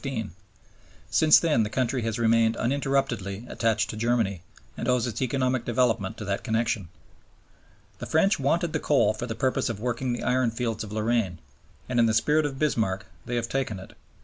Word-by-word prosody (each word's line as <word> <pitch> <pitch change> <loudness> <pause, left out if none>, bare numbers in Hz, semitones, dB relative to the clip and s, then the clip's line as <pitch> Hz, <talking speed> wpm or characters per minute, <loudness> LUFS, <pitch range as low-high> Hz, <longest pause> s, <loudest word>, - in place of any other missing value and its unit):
Since 155 -1 +6
then 155 -9 +2
the 105 - 0
country 125 +2 0
has 115 -1 -2
remained 115 0 +3
uninterruptedly 125 -6 -1
attached 110 -1 0
to - - -7
Germany, 110 -5 0 0.3
and - - -4
owes 125 -2 +2
its 120 -1 -4
economic 130 -1 0
development 120 -5 0
to 105 - -6
that 100 0 -2
connection." 110 -3 -1 1.1
The - - -6
French 195 +4 +3
wanted 165 +4 +1
the 160 - 0
coal 145 -7 +3
for 120 +3 -5
the 115 - -4
purpose 130 +2 0
of 110 -3 -4
working 125 +2 -2
the 120 - -3
ironfields 120 -3 0
of 105 - -9
Lorraine, 110 -4 0 0.5
and 125 -1 0
in 115 - +5
the 110 - +1
spirit 150 +6 +3
of 135 -2 -7
Bismarck 110 -10 0 0.2
they 120 - -2
have 120 -1 -1
taken 125 -6 -2
it. 95 - -12
120 Hz, 175 wpm, -26 LUFS, 110-130 Hz, 1.1 s, Since